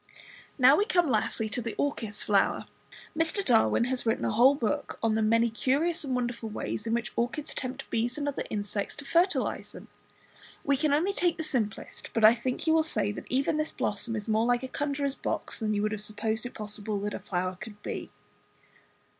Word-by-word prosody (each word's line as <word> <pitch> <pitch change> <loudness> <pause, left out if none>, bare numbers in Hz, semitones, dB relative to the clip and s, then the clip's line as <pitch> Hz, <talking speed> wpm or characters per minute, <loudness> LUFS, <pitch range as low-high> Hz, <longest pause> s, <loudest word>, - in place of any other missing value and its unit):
Now 265 +1 +7
we 410 - +3
come 350 - +2
lastly 220 0 0
to 245 - -2
the 230 -1 -4
Orchis 225 -7 -2
flower. 200 -2 +2 0.5
Mr. 325 +5 +1
Darwin 235 -1 +4
has 250 +1 -1
written 225 0 0
a - - +1
whole 250 +6 +6
book 230 -7 -2
on 225 -1 +3
the 220 - +1
many 230 +2 +3
curious 290 +9 +1
and 265 -3 -1
wonderful 240 -2 -2
ways 210 +1 -4
in 225 - +1
which 235 0 -3
orchids 255 +6 -2
tempt 260 +1 -5
bees 235 +3 0
and 290 -1 -2
other 285 - -2
insects 205 -1 -3
to 300 - -9
fertilize 345 +6 +1
them. - - -11 0.7
We 280 - +3
can 295 +2 +1
only 335 +8 +2
take 350 -3 +1
the 320 - -3
simplest, 240 -8 -3
but 225 -2 +5
I 220 - +9
think 245 +2 -3
you 320 - +4
will 320 - +5
say 305 -10 0
that 205 - -8
even 270 +4 +1
this 305 0 0
blossom 220 +3 -2
is 210 0 -4
more 220 +1 +2
like 245 +1 +2
a - - -3
conjuror's 280 0 -1
box - - -3
than 215 -2 0
you 205 - 0
would 215 - 0
have 215 -1 -3
supposed 220 +2 -2
it - - -13
possible 210 0 -3
that 210 0 -3
a - - -4
flower 185 0 -2
could 210 -2 -9
be. - - -5
240 Hz, 210 wpm, -28 LUFS, 215-285 Hz, 0.7 s, I